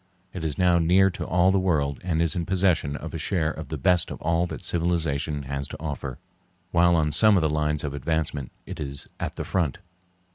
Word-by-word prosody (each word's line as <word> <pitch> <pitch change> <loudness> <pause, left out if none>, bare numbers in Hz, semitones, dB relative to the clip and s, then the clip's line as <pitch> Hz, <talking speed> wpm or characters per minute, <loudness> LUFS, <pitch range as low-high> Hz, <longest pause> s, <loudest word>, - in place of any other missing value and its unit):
It 90 - -5
is 75 -3 -1
now 90 -2 +4
near 95 +4 +4
to - - -6
all 90 +1 +3
the 95 - +2
world 75 -7 0
and 85 -2 +1
is 85 - 0
in 85 - -1
possession 90 -6 +1
of 80 +2 -7
a 80 - -4
share 80 -1 0
of 80 -2 -7
the 80 - -4
best 85 +5 +2
of - - -7
all 85 +2 +1
that - - -7
civilization 80 -4 0
has 70 +1 -4
to - - -8
offer, 70 -4 -5 0.5
while 85 0 +4
on 75 -2 +2
some 110 +4 +5
of - - +3
the 80 - +2
lines 75 0 0
of 75 -2 -3
advancement 75 -1 -2
it - - -8
is 70 -1 -3
at - - -4
the - - -4
front. 85 -7 0
80 Hz, 220 wpm, -25 LUFS, 75-90 Hz, 0.5 s, some